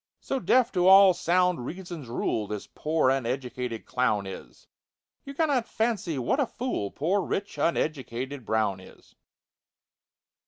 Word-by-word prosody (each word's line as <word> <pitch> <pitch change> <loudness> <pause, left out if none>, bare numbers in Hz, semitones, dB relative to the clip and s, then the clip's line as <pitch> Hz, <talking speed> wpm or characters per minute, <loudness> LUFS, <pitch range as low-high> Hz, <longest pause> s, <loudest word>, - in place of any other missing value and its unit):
So 270 - -3
deaf 250 -1 +3
to 180 -1 +2
all 190 0 +8
sound 180 -3 +1
Reason's 175 -1 -7
rule 115 -2 -2
This 105 -1 -5
poor 155 -4 +1
uneducated 125 -2 -3
clown 110 -5 0
is, 95 - -10 0.6
You 275 0 -8
can_not_ 280 -7 +1
fancy 220 -9 -1
what 130 - 0
a 275 - +2
fool 230 - -3
Poor 180 - 0
rich 200 +3 -4
uneducated 135 -5 -2
BROWN 110 -3 0
is. 95 - -17
155 Hz, 130 wpm, -27 LUFS, 120-195 Hz, 0.6 s, all